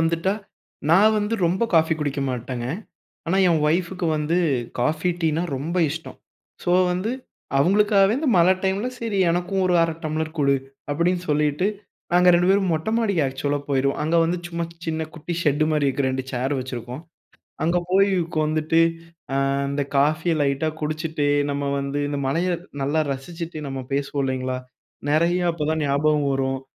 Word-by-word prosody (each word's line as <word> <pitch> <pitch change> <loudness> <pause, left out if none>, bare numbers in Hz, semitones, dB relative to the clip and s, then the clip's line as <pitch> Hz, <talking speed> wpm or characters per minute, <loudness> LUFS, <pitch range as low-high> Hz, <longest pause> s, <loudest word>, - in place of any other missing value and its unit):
வந்துட்டா, 165 +4 +1 0.6
நான் 210 +6 +6
வந்து 210 +2 -1
ரொம்ப 185 +6 0
காஃபி 160 0 +4
குடிக்க 145 -1 -2
மாட்டேங்க. 125 0 -4 0.6
ஆனா, 185 +4 +1
என் 165 -3 +2
ஒய்ஃப்க்கு 175 +2 0
வந்து 150 +3 0 0.4
காஃபி, 155 +7 +1
டீன்னா 160 0 +1
ரொம்ப 160 +7 -3
இஷ்டம். 160 +2 -7 0.5
சோ, 175 - 0 0.2
வந்து 185 +5 -2 0.5
அவுங்களுக்காகவே 200 +5 +4
வந்து 290 +1 -1
மழை 175 +2 +6
டைம்ல 195 +5 0
சரி 220 -4 -2
எனக்கும் 180 +2 0
ஒரு 180 - +2
1/2 165 -1 +1
டம்ளர் 155 0 -2
குடு. 140 -1 +3 0.4
அப்பிடின்னு 175 +4 +1
சொல்லிட்டு, 150 +4 +1 0.5
நாங்க 180 0 +5
2 175 +1 +3
பேரும் 195 -2 +3
மொட்டை 160 +6 -1
மாடிக்கு 200 -8 +1
ஆக்ஸூலா 140 +2 -1
போயிருவோம். 140 0 +1
அங்க 160 +3 +1
வந்து 175 +2 0
சும்மா 170 0 -3 0.2
சின்ன 160 0 -1
குட்டி 160 +1 -6
ஷெட் 150 0 +2
மாரி 150 -2 +2
இருக்கிற 135 0 0
2 130 0 -3
சேர் 130 +3 -1
வச்சிருக்கிறோம். 125 +1 -6 0.6
அங்க 170 +2 +2
போயி 195 +2 +4 0.2
உக்காந்துட்டு, 155 0 +1 0.5
அ - - +1 0.3
இந்த 140 +1 -1
காஃபிய 155 +4 +2
லைட்டா 140 +3 +1
குடிச்சுட்டு, 155 0 -2 0.2
நம்ம 140 0 -2
வந்து 140 +1 -2
இந்த 145 -1 -2
மழைய 165 +7 0 0.3
நல்லா 145 +4 +1
ரசிச்சுட்டு, 165 +4 -7
நம்ம 135 -1 -4
பேசுவோம் 140 0 -1
இல்லேங்களா? 130 -1 -2 0.5
நெறைய 170 +4 +2
அப்பதான் 155 -1 -1
ஞாபகம் 145 +1 +2
வரும், 135 0 -1
155 Hz, 155 wpm, -23 LUFS, 140-175 Hz, 0.6 s, நான்